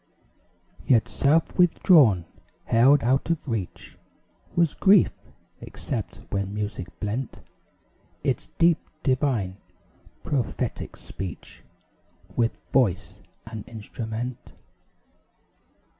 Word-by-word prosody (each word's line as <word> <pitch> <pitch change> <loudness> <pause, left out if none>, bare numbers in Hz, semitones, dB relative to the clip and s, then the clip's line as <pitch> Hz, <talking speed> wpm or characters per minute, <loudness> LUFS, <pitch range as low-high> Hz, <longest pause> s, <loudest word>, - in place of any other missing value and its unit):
Yet 115 -4 +4
self 155 +6 +1
withdrawn 150 - +5 0.4
held 130 +5 +5
out 130 +6 +1
of 165 -3 -1
reach 110 -8 -5 0.6
Was 170 -3 +3
grief; 195 -2 +5 0.5
except - - -5
when 100 0 -2
music 105 -3 -4
blent 110 +5 -3 0.9
Its - - -1
deep, 170 -1 +4 0.2
divine, 130 -9 0 0.7
prophetic 135 -7 -2
speech 95 -2 -8 0.7
With 115 -1 +1 0.2
voice 100 -7 +1 0.3
and 110 -2 -7
instrument. 115 +2 -5
120 Hz, 85 wpm, -25 LUFS, 105-145 Hz, 0.9 s, withdrawn